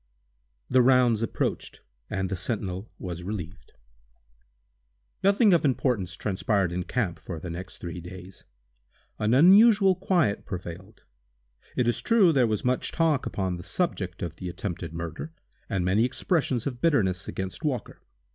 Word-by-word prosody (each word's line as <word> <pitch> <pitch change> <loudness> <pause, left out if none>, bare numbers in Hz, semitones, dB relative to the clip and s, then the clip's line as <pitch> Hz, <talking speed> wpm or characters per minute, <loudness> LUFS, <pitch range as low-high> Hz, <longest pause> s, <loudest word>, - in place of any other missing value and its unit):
The 130 - +4
"rounds" 125 -3 +4
approached, 115 - -3 0.3
and 95 -1 -2
the - - 0
sentinel 95 +1 -3
was 90 -2 -6
relieved. 95 -1 -7 1.5
Nothing 200 +1 +5
of 170 - +3
importance 120 - 0
transpired 100 -2 0
in 90 0 -3
camp 100 -9 -2
for 85 -3 -7
the 85 +1 -6
next 90 +3 -7
three 85 0 -6
days. 90 +1 -11 0.8
An 110 +3 +2
unusual 195 - +7
quiet 175 - +1
prevailed. 90 +3 -8 0.7
It 125 - +1
is 120 - +1
true, 215 -7 +4
there 130 -4 +4
was 110 0 -2
much 125 0 0
talk 160 -5 +1
upon 95 -3 -2
the 85 - -9
subject 95 - -2
of 80 -2 -5
the 90 - -5
attempted 85 - -5
murder, 85 - -6 0.4
and 95 -2 -1
many 100 +5 +3
expressions 130 - 0
of 125 -3 -4
bitterness 100 - +1
against 95 - -5
Walker. 135 -7 -3
105 Hz, 145 wpm, -26 LUFS, 90-135 Hz, 1.5 s, unusual